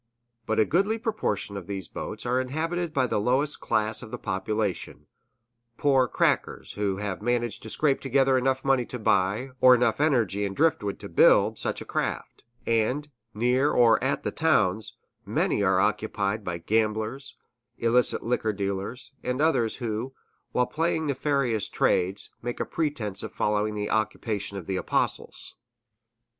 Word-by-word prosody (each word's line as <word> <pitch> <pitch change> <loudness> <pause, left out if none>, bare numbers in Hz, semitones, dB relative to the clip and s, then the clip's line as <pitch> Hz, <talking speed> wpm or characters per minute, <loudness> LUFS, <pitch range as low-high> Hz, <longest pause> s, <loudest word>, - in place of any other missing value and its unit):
But 110 - +1
a 110 - +5
goodly 195 - +1
proportion 215 - -2
of 95 -3 -7
these 95 -4 -5
boats - - -6
are 125 +1 +1
inhabited 165 +6 -2
by 135 -4 +1
the 115 - 0
lowest 135 +6 +1
class 110 0 0
of - - -9
the - - -5
population, 100 0 -3 0.7
poor 135 -3 +3
"crackers" - - 0
who 100 -2 -1
have 100 -3 -4
managed 120 0 -1
to 110 - -8
scrape 140 +3 +1
together 135 0 +3
enough 130 +1 +1
money 135 -2 +3
to 125 - -5
buy, 105 +4 +1
or 130 0 +8
enough 125 +3 +1
energy 115 - +2
and 100 -1 -3
driftwood 145 -11 +1
to - - -6
build, - - +4
such - - -2
a - - -7
craft; - - -3 0.2
and, 125 +6 0 0.2
near 125 +6 +2
or 120 -4 +4
at - - 0
the - - -1
towns, 95 +4 +1 0.3
many - - 0
are 95 -2 +3
occupied 105 0 0
by 90 -2 -3
gamblers, 110 +7 -1 0.4
illicit 120 +1 +3
liquor 115 -2 0
dealers, 100 +6 -4
and 125 +1 -2
others 145 -8 +2
who, 120 +2 -4 0.4
while 125 - +2
plying 160 +3 -1
nefarious 140 -6 0
trades, 95 +3 +1
make 120 0 -4
a - - 0
pretense 140 - -2
of - - -6
following 105 0 0
the 105 0 -3
occupation 105 -2 -1
of 95 - -7
the 95 +1 -2
Apostles. - - -2
115 Hz, 155 wpm, -26 LUFS, 105-135 Hz, 0.7 s, or